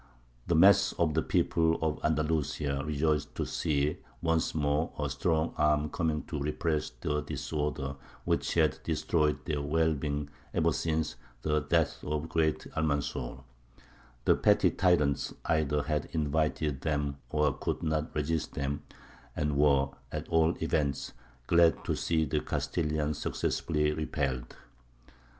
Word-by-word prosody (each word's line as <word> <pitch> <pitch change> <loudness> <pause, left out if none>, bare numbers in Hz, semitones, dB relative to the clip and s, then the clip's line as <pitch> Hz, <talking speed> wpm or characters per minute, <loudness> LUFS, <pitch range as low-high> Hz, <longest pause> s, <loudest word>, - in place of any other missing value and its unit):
The 85 - +2
mass 100 +4 +6
of 80 -3 +1
the - - +2
people 80 -1 +2
of 80 -1 -2
Andalusia 75 -2 0
rejoiced 75 0 0
to - - -1
see 75 0 0 0.2
once 80 +1 0
more 75 +1 +1
a 75 - -1
strong 80 +3 0
arm 75 0 +3
coming 80 -3 -1
to 75 - -5
repress 75 +1 -1
the 75 0 0
disorder 75 -3 -3 0.3
which - - 0
had 80 -5 +3
destroyed 75 -3 0
their 75 -3 -1
well 80 +2 +2
being 75 0 -3 0.2
ever - - +3
since 80 -4 -1 0.3
the 75 0 +2
death 80 +2 +1
of 75 0 -2
the - - -6
great 80 -2 +1
Almanzor; 70 -4 -2 0.8
the - - +6
petty - - +4
tyrants 75 -6 +2
either 75 -2 +1
had 75 +1 -1
invited 75 -2 0
them 75 -2 -1
or 75 -1 +2
could - - -3
not 80 -1 0
resist 75 -1 -1
them, 70 +1 -2 0.5
and 75 -1 0
were, 70 -1 +4 0.2
at - - -4
all 80 +1 +3
events, 70 -4 -1 0.3
glad 85 +2 +4
to - - 0
see 80 -2 +1
the - - 0
Castilians 75 -1 -1
successfully 75 -2 0
repelled. 70 -5 -2
75 Hz, 135 wpm, -30 LUFS, 75-80 Hz, 0.8 s, mass